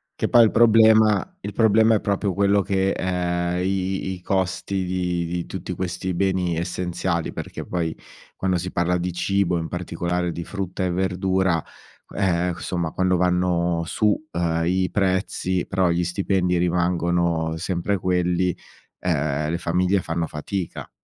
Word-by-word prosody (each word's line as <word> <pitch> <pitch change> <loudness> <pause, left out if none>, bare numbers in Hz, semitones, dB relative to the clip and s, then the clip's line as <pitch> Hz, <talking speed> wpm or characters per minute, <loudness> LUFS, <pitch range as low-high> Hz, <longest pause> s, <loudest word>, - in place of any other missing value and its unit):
che - - -1
poi 120 -1 +6
il 110 - +5
problema 110 -2 +5
il 100 +1 -6
problema 110 0 +4
è 105 - +2
proprio 100 -1 0
quello 100 +1 +3
che 95 0 +1
ehm, 90 -1 -1
i 95 0 -1
i - - -2
i 90 - -9
costi 95 +1 -1
di 90 -1 -1
di 85 0 -3
tutti 90 -1 -6
questi 90 +1 -3
beni 90 -2 0
essenziali, 85 0 -2
perché - - -6
poi 85 -3 -2 0.4
quando 95 -1 0
si 90 +2 -4
parla 90 +1 +1
di 90 0 -3
cibo, 90 -1 +1
in 80 - -4
particolare 90 0 -2
di 85 - -5
frutta 95 -1 -4
e 90 - +1
verdura, 95 -1 +1
q - - -20
ehm, 90 -2 +1
cu - - -10
somma 85 -3 -2
quando 95 0 +1
vanno 90 -1 +1
su, 105 +6 0 0.2
uhm, 85 -1 0
i 90 +1 +1
prezzi 95 -1 0
però 95 -2 +1
gli 85 +1 +1
stipendi 90 0 0
rimangono 85 -2 +1
sempre 90 +3 -1
quelli, 90 -1 +1 0.4
ehm, 75 -3 -1
le 85 - -1
famiglie 90 +3 +1
fanno 85 0 -2
fatica. 85 +4 -5
90 Hz, 155 wpm, -23 LUFS, 85-95 Hz, 0.4 s, poi